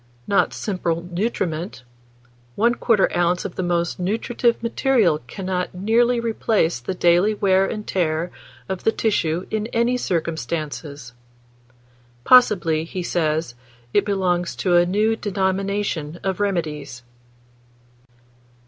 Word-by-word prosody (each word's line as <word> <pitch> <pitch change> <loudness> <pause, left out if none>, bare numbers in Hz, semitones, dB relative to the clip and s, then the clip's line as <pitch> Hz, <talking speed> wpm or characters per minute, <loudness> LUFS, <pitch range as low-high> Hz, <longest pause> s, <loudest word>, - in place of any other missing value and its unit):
Not 200 - +2
simple 170 -5 -2
nutriment; 175 - -2 0.7
1/4 230 -2 +2
oz. 175 +1 +1
of - - -4
the - - -3
most 175 -1 -1
nutritive 230 +5 0
material 230 - +2
cannot 185 0 -3
nearly 235 +5 +2
replace 220 - 0
the 155 +10 -4
daily 175 +5 +3
wear 195 -1 +3
and 210 0 -5
tear 170 -1 -1 0.4
of 190 -1 -4
the 225 - +3
tissue 180 -7 0
in 215 0 -1
any 235 +2 +1
circumstances." 155 - -4 1.1
Possibly, 180 - +5
he 180 +2 -5
says, 160 -5 -1 0.4
it 205 - +4
belongs 185 -4 0
to 180 -2 +1
a 175 0 +5
new 215 +4 +2
denomination 195 -5 -2
of 190 0 -2
remedies. 155 -10 -2
185 Hz, 110 wpm, -22 LUFS, 170-210 Hz, 1.1 s, Possibly